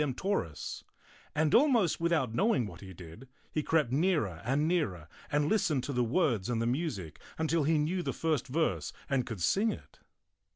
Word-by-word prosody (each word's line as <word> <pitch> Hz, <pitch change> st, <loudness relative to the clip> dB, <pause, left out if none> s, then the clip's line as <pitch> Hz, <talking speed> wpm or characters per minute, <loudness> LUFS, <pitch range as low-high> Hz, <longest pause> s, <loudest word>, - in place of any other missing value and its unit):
7p 140 Hz, -4 st, -1 dB
toris, 185 Hz, -, -3 dB, 0.5 s
and 155 Hz, 0 st, +2 dB
almost 240 Hz, -, +4 dB
without 165 Hz, -9 st, +1 dB
knowing 140 Hz, -, +2 dB
what 105 Hz, -, -9 dB
he 95 Hz, -2 st, -9 dB
did, 90 Hz, +8 st, -11 dB, 0.2 s
he 155 Hz, -, 0 dB
crept 150 Hz, -5 st, +1 dB
nearer 140 Hz, -, +1 dB
and 140 Hz, +7 st, +1 dB
nearer 105 Hz, -, -1 dB, 0.2 s
and 145 Hz, 0 st, +2 dB
listened 160 Hz, -, +1 dB
to 140 Hz, -, -3 dB
the 125 Hz, -1 st, +2 dB
words 120 Hz, -, +1 dB
and 120 Hz, -2 st, 0 dB
the 115 Hz, -, 0 dB
music 120 Hz, -, -3 dB, 0.2 s
until 160 Hz, -1 st, +1 dB
he 160 Hz, +1 st, +3 dB
knew 165 Hz, +5 st, 0 dB
the -, -, -2 dB
first 155 Hz, -5 st, -1 dB
verse 155 Hz, +5 st, 0 dB, 0.2 s
and 135 Hz, -4 st, 0 dB
could 110 Hz, -7 st, -6 dB
sing 215 Hz, -, +2 dB
it. -, -, -11 dB
145 Hz, 180 wpm, -31 LUFS, 115-165 Hz, 0.5 s, almost